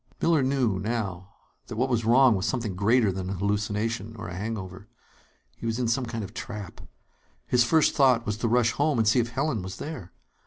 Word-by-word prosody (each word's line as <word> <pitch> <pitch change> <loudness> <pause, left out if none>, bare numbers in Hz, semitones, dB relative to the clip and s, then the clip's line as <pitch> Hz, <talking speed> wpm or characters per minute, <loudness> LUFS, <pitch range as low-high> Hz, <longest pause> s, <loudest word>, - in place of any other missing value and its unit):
Miller 165 -3 +3
knew, 130 -7 +1
now, 100 -4 -3 0.4
that - - -6
what 125 +4 +1
was 120 -3 0
wrong 125 +2 +6
was 95 +1 -1
something 115 -7 -2
greater 110 +2 +3
than 95 0 -4
a - - -2
hallucination 105 +2 -2
or 90 - -7
a 90 - -7
hangover. 100 -1 -6 0.7
He 115 - -6
was 115 0 -1
in 125 -2 0
some 120 +2 0
kind 115 -2 -4
of 100 +1 -9
trap. 105 -6 -7 0.6
His 120 - +3
first 155 +6 +3
thought 130 -4 +4
was 105 -1 -2
to 115 - -1
rush 115 0 +3
home 145 +1 +1
and 110 -2 +2
see 115 +4 +4
if 120 0 0
Helen 135 -2 -1
was 95 +1 -7
there. 135 - -7
115 Hz, 205 wpm, -26 LUFS, 100-125 Hz, 0.7 s, wrong